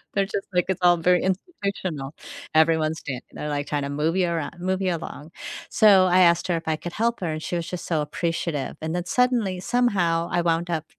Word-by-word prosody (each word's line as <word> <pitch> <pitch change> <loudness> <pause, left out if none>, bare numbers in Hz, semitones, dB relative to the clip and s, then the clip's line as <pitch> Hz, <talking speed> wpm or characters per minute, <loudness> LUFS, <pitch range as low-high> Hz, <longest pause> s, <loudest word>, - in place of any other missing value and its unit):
They're 200 0 +2
just 195 0 -4
like, 180 0 +2
it's 190 - 0
all 175 0 +6
very 180 +2 +3
institutional, 190 - -3 0.4
everyone's 160 0 +3
standing, 130 -3 -6
their 150 - -5
like, 145 -1 -2
kinda 145 -1 -2
move 150 +4 0
you 185 -2 +2
around, 170 0 -3
move 185 +1 0
you 185 -2 +1
along. 160 -1 -8 0.4
So, 200 -4 +6
I 180 +1 +4
asked 170 -1 +4
her 175 - +2
if 165 - -8
I 160 - +2
could 175 +2 -7
help 235 +2 0
her, 170 -3 -1
and 155 0 -4
she - - -3
was 170 - -4
just 180 -1 -5
so 165 -3 0
appreciative, 160 -2 -2
and 160 +1 -3
then 175 - -2
suddenly, 230 -4 +1
somehow, 180 -9 +1
I 175 - +2
wound 170 +1 0
up 160 -2 -2
170 Hz, 220 wpm, -24 LUFS, 160-185 Hz, 0.4 s, all